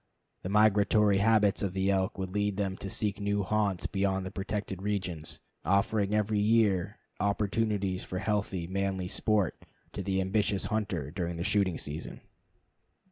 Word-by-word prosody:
The 90 - -5
migratory 105 -1 +4
habits 105 -1 +3
of 95 -3 -1
the 95 +1 +1
elk 95 +2 0
would 95 -1 -4
lead 105 0 0
them 95 -2 -1
to 100 - -6
seek 105 +1 -1
new 100 0 0
haunts 100 -2 0
beyond 95 -1 0
the 95 - -5
protected 95 -1 -4
region, 95 -6 -2 0.4
offering 100 +3 +2
every 105 0 +1
year 105 -3 +2 0.2
opportunities 100 -2 0
for 90 - -5
healthy, 100 -3 -1
manly 95 0 -2
sport 105 -3 0 0.3
to - - -4
the 95 -1 -1
ambitious 100 +1 0
hunter 90 -10 -2
during 85 -1 -3
the 85 - -2
shooting 100 -3 +1
season. 75 +2 -5
100 Hz, 150 wpm, -30 LUFS, 95-105 Hz, 0.4 s, migratory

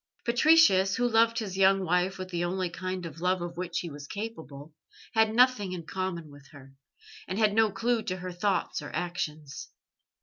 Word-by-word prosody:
Patricius, 235 -7 +5
who 245 -1 +1
loved 230 0 +3
his 205 -5 -3
young 195 0 +4
wife 180 +2 +1
with 185 0 -6
the 175 -1 -2
only 180 0 -2
kind 185 0 -5
of 165 0 -9
love 185 +1 +1
of 175 0 -6
which 175 -1 -3
he 170 - -6
was 145 0 -9
capable, 160 -9 -7 0.4
had 220 -1 +3
nothing 245 -6 +3
in 170 -3 -6
common 170 -4 -4
with 145 -1 -15
her, 135 -2 -15 0.5
and 185 - -4
had 215 -2 +3
no 220 -1 +3
clue 235 +2 0
to 185 - -3
her 185 0 -6
thoughts 180 -2 -1
or 145 - -7
actions. 155 -5 -4
185 Hz, 190 wpm, -28 LUFS, 170-215 Hz, 0.5 s, Patricius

